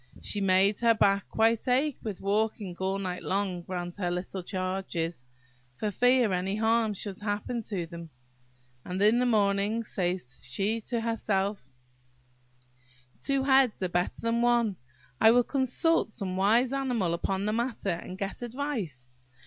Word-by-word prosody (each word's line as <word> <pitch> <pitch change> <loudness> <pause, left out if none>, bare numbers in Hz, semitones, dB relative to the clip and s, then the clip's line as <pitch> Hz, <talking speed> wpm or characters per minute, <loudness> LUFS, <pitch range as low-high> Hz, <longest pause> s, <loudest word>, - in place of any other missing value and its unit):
She 205 - 0
made 195 +1 +3
her 230 -1 +4
back 200 -2 +2
quite 225 +2 +2
ache 265 +3 +1
with 210 -4 -5
walking 205 -2 -1
all 190 +1 0
night 185 -2 -4
long 190 -2 -1
round 175 -1 -4
her 180 -3 -1
little 180 +2 -4
charges, 185 -6 -3 0.5
for 210 +10 -2
fear 245 -1 +3
any 185 +2 -1
harm 220 0 +2
should 195 -1 -3
happen 210 +3 -2
to 195 -5 -4
them; 170 0 -9 0.7
and 180 +1 -4
in 215 +4 +5
the 250 - +2
morning 205 0 +2
says 180 - -3
she 200 - -1
to 235 -1 -1
herself– 205 - -1 1.5
"Two 275 -1 0
heads 265 -6 +3
are 185 - 0
better 175 +1 -1
than 230 +1 +1
one. 235 -4 +2 0.4
I 220 - +7
will 245 +2 +5
consult 270 +2 +1
some 190 -3 -4
wise 230 +7 +3
animal 245 -10 0
upon 190 +3 -1
the 215 - 0
matter, 235 -4 -1
and 175 +2 -5
get 195 +3 -4
advice. 235 - -4
205 Hz, 150 wpm, -28 LUFS, 185-230 Hz, 1.5 s, I